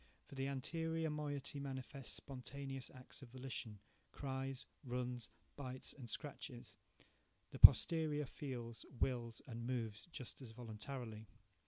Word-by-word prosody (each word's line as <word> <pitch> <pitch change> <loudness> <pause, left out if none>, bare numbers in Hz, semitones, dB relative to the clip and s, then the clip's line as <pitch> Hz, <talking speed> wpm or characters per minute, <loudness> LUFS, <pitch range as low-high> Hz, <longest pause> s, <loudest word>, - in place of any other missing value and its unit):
For - - -13
the 135 0 0
anterior 160 +4 0
moiety 145 -1 -2
manifests 135 -1 -4
spontaneous 135 0 -5
acts 130 +3 -10
of 130 - -9
volition, 125 -4 -4 0.3
–cries, 135 -1 -2 0.2
runs, 125 -2 -2 0.3
bites, 130 -2 -3
and 125 -4 -8
scratches; 120 -7 -5 0.8
the - - -6
posterior 155 -3 +9
feels, 120 -4 -5 0.2
wills, 120 -3 +1
and 115 -2 -4
moves 115 -3 -1
just 130 -1 -6
as 115 -4 -7
voluntarily. 110 -1 -5
130 Hz, 120 wpm, -41 LUFS, 120-140 Hz, 0.8 s, posterior